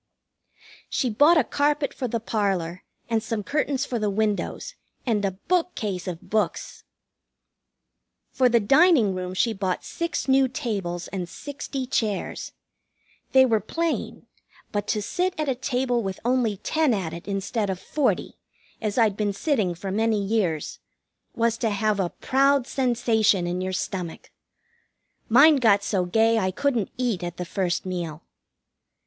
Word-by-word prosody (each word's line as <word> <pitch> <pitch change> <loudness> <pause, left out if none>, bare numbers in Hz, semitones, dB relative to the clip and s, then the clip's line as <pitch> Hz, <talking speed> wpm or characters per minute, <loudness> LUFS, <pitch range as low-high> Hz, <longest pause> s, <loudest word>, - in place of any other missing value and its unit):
She 250 - 0
bought 295 +10 +5
a 305 - +5
carpet 290 +2 0
for 255 - -3
the 230 0 -2
parlor, 195 -6 -1 0.2
and 225 -1 +1
some 225 -1 -3
curtains 285 +2 0
for 240 -3 -3
the 210 -1 0
windows, 210 0 -1 0.3
and 220 -5 +1
a 195 - +2 0.2
bookcase 225 - -1
of 175 -2 -6
books. 215 0 -2 1.5
For 255 -1 +3
the 235 -1 +4
dining 270 - +5
room 185 0 -4
she 225 +4 +2
bought 190 -3 -2
six 335 -4 -3
new 265 0 +4
tables 200 - -3
and 180 -3 -4
sixty 275 +2 -5
chairs. 215 -5 -2 0.8
They 265 0 +7
were 225 -4 +2
plain, 330 +10 -3 0.5
but 205 -1 -2
to 210 - 0
sit 365 - -1
at 305 - 0
a 265 - +2
table 250 -1 -1
with 195 -3 -4
only 240 -4 +1
ten 310 +1 +1
at 175 -5 -3
it 170 +3 -9
instead 200 +2 -2
of 185 -1 -2
forty, 295 +6 -1 0.4
as 215 -1 -2
I'd 220 -4 +3
been 205 -1 -1
sitting 205 - 0
for 190 +3 -5
many 220 +1 +1
years, 195 -6 -1 0.6
was 230 0 +1
to 230 - +1
have 210 0 0
a 180 -2 +1
proud 275 +3 +2
sensation 230 -8 +2
in 175 +1 -2
your 185 0 -2
stomach. 180 -2 -4 1.0
Mine 285 +6 +7
got 210 -6 +4
so 190 -3 0
gay 225 +5 +3
I 190 -3 +1
couldn't 235 +1 0
eat 240 -7 -1
at 175 0 -5
the 180 - -4
first 180 0 -1
meal. 170 -4 -4
220 Hz, 155 wpm, -25 LUFS, 190-260 Hz, 1.5 s, They